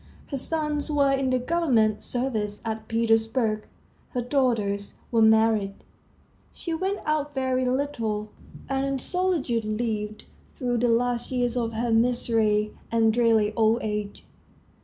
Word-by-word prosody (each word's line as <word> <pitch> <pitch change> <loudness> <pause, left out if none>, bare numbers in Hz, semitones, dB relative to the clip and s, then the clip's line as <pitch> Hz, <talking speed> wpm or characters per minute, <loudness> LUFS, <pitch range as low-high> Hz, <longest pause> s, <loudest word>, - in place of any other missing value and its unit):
Her 275 - -1
sons 300 +1 -2
were 280 -2 +3
in 270 -1 +1
the 255 - +2
government 250 -7 +2
service 220 -5 -2
at 220 -1 -4
Petersburg; 225 -1 +1 0.5
her 250 - 0
daughters 230 -7 0 0.2
were 230 -2 +3
married; 220 -2 +4 0.8
she 335 - -5
went 380 +4 -2
out 295 -1 -1
very 260 -1 0
little, 230 -6 -1 0.4
and 270 0 0
in 275 0 -1
solitude 315 -7 0
lived 215 -1 -3 0.3
through 245 -3 -1
the 245 - +2
last 240 +1 +1
years 245 -2 0
of 230 -2 -1
her 230 +1 -1
miserly 225 -2 +2 0.2
and 225 -1 +3
dreary 225 -3 +3
old 225 0 +3
age. 210 -1 -4
235 Hz, 135 wpm, -26 LUFS, 220-265 Hz, 0.8 s, married